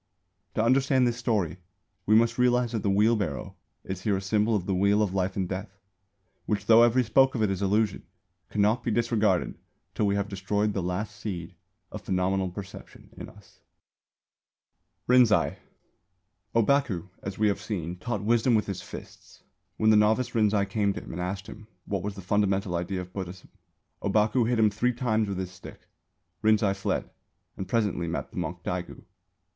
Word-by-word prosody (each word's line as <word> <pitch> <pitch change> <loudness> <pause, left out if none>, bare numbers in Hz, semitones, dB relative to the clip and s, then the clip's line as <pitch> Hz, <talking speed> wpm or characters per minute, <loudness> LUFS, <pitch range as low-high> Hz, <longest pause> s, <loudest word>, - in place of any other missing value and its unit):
To 110 - +2
understand 130 +1 +3
this 120 -1 0
story 105 -9 -1 0.5
we 110 - +5
must 115 +1 +3
realise 125 -1 +3
that 115 -3 -2
the 100 - 0
wheel 105 +4 +4
barrow 90 -10 -4 0.3
is 95 -1 -5
here 100 -1 +1
a - - -2
symbol 105 +3 +1
of 95 -4 -1
the 95 - -1
Wheel 100 +3 +3
of 95 -3 -2
Life 95 0 -1
and 95 -2 -1
Death, 95 +1 -6 0.7
which, 105 -1 -1
though 115 0 +7
every 120 +2 +4
spoke 130 +4 +3
of 110 - +1
it 105 - +2
is 95 0 -3
illusion, 100 +1 +1 0.5
cannot 110 +3 +1
be - - -1
disregarded 110 -5 +1 0.3
till 105 - 0
we 100 - +1
have 100 0 -1
destroyed 100 +2 -1
the 95 - -1
last 95 +4 -3
seed 90 -5 -6 0.4
of - - -7
phenomenal 95 0 0
perception 95 +2 -10
in - - -8
us. 105 -3 -19 1.5
RINZAI. 110 - +4 1.0
Ōbaku, 115 - +2
as 95 0 -6
we 110 - +3
have 100 - 0
seen, 90 -5 -4
taught 105 0 -3
wisdom 115 +2 +3
with 105 - +2
his 100 -3 -5
fists. - - -12 0.3
When 110 0 +4
the 110 - +6
novice 110 +4 +2
Rinzai 105 -3 +2
came 100 0 0
to - - -6
him - - -10
and 90 - -5
asked 95 +2 -4
him 105 +3 -11 0.2
what 100 -2 -2
was 100 +1 -4
the 100 - -8
fundamental 100 -1 +1
idea 90 +2 -2
of 90 0 -11
Buddhism, 95 -1 -7 0.5
Ōbaku 110 +4 +2
hit 125 - +1
him 110 -2 +4
three 125 +5 0
times 110 -3 0
with 100 - -3
his 95 -1 -4
stick. 90 - -12 0.6
Rinzai 110 -2 +3
fled 95 - -2 0.4
and 95 - -6
presently 105 -7 0
met 85 - -4
the - - -12
monk - - -4
Daigu. - - -5
105 Hz, 180 wpm, -27 LUFS, 95-110 Hz, 1.5 s, though